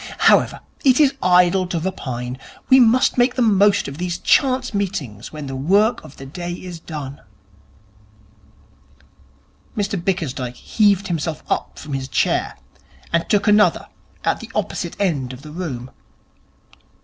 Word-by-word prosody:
However, -, -, +2 dB, 0.2 s
it 260 Hz, -1 st, +5 dB
is 285 Hz, -3 st, +5 dB
idle 180 Hz, +1 st, +4 dB
to 175 Hz, -2 st, -2 dB
repine. 130 Hz, -8 st, -4 dB, 0.3 s
We 260 Hz, -, +7 dB
must 245 Hz, +1 st, +4 dB
make 245 Hz, +1 st, +3 dB
the 255 Hz, -, +2 dB
most 205 Hz, -2 st, +3 dB
of 140 Hz, +3 st, -8 dB
these 175 Hz, -1 st, -2 dB
chance 260 Hz, -3 st, +2 dB
meetings 180 Hz, -, -4 dB
when 150 Hz, -2 st, -7 dB
the 135 Hz, -1 st, -5 dB
work 200 Hz, -, +2 dB
of 135 Hz, -, -14 dB
the 135 Hz, -, -9 dB
day 175 Hz, +5 st, -6 dB
is 175 Hz, -2 st, -8 dB
over.' 145 Hz, -3 st, -7 dB, 2.5 s
Mr 200 Hz, -4 st, -2 dB
Bickersdyke 140 Hz, -10 st, -2 dB
heaved 200 Hz, -, +1 dB
himself 165 Hz, -2 st, -3 dB
up -, -, -2 dB
from 150 Hz, -, -7 dB
his 135 Hz, -1 st, -3 dB
chair -, -, 0 dB, 0.6 s
and 170 Hz, 0 st, +1 dB
took 205 Hz, +1 st, +2 dB
another 210 Hz, 0 st, +3 dB, 0.3 s
at -, -, 0 dB
the -, -, -10 dB
opposite -, -, -3 dB
end 145 Hz, -10 st, -1 dB
of 130 Hz, +2 st, -11 dB
the 150 Hz, -, -10 dB
room. 140 Hz, -8 st, -5 dB
175 Hz, 145 wpm, -20 LUFS, 140-205 Hz, 2.5 s, We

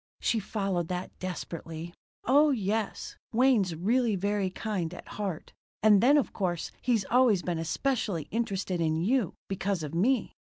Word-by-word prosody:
She 230 Hz, -, +1 dB
followed 195 Hz, -4 st, -2 dB
that 180 Hz, +1 st, -4 dB
desperately. 170 Hz, -2 st, -6 dB, 0.3 s
"Oh 290 Hz, +4 st, +5 dB
yes, 215 Hz, -4 st, -2 dB, 0.2 s
Wayne's 225 Hz, -8 st, +3 dB
really 225 Hz, +6 st, +2 dB
very 200 Hz, 0 st, 0 dB
kind 185 Hz, -4 st, -3 dB
at -, -, -11 dB
heart. 195 Hz, -6 st, -5 dB, 0.3 s
And 210 Hz, -2 st, +6 dB
then 280 Hz, +5 st, +6 dB
of 285 Hz, -, 0 dB
course 175 Hz, -4 st, -2 dB
he's 230 Hz, -6 st, +1 dB
always 235 Hz, -7 st, +4 dB
been 175 Hz, -2 st, -2 dB
especially 200 Hz, -, -1 dB
interested 195 Hz, -5 st, -1 dB
in 160 Hz, -1 st, +1 dB
you, 200 Hz, +4 st, +1 dB
because 195 Hz, -2 st, -2 dB
of 150 Hz, -, -5 dB
me." 235 Hz, +10 st, +1 dB
195 Hz, 145 wpm, -29 LUFS, 175-230 Hz, 0.3 s, And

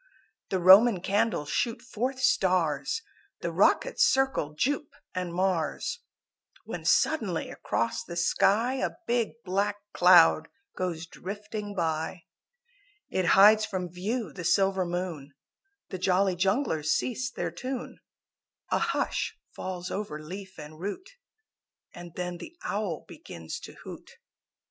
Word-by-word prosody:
The 190 Hz, -, 0 dB
Roman 190 Hz, +4 st, +7 dB
Candles 200 Hz, -6 st, 0 dB
shoot 230 Hz, -1 st, 0 dB
forth 255 Hz, +2 st, -3 dB
stars, 185 Hz, -, +1 dB, 0.4 s
The -, -, -2 dB
rockets -, -, +3 dB
circle 265 Hz, -, +2 dB
Jupe 285 Hz, -, -1 dB, 0.2 s
and 180 Hz, -1 st, -3 dB
Mars, 180 Hz, -, -1 dB, 0.7 s
When -, -, -6 dB
suddenly 210 Hz, -, +1 dB
across 115 Hz, -, -2 dB
the 170 Hz, -, -8 dB
sky 215 Hz, +8 st, +2 dB
A -, -, -2 dB
big 235 Hz, -2 st, 0 dB
black 200 Hz, +2 st, 0 dB, 0.2 s
cloud 175 Hz, -3 st, +6 dB, 0.3 s
goes 175 Hz, -3 st, -3 dB
drifting 205 Hz, +3 st, -7 dB
by. 160 Hz, 0 st, -2 dB, 0.9 s
It 185 Hz, -, 0 dB
hides 215 Hz, +2 st, +8 dB
from 185 Hz, -5 st, -3 dB
view 200 Hz, -, -3 dB
the 180 Hz, -, -7 dB
silver 190 Hz, +1 st, +2 dB
moon, 170 Hz, -6 st, -4 dB, 0.5 s
The 185 Hz, -, -5 dB
Jolly 185 Hz, +1 st, +2 dB
Junglers 185 Hz, -, 0 dB
cease 255 Hz, +10 st, 0 dB
their -, -, -4 dB
tune; 260 Hz, -1 st, -6 dB, 0.7 s
A -, -, +3 dB
hush -, -, -1 dB, 0.2 s
falls 180 Hz, -1 st, -5 dB
over 195 Hz, -7 st, -4 dB
leaf 190 Hz, +5 st, -9 dB
and 155 Hz, 0 st, -10 dB
root 205 Hz, -, -5 dB, 0.8 s
And 175 Hz, -1 st, -10 dB
then 180 Hz, -1 st, -4 dB
the 335 Hz, -, -10 dB
Owl 200 Hz, -6 st, -3 dB
begins 80 Hz, -1 st, -8 dB
to -, -, -10 dB
hoot. -, -, -10 dB
185 Hz, 125 wpm, -28 LUFS, 170-220 Hz, 0.9 s, hides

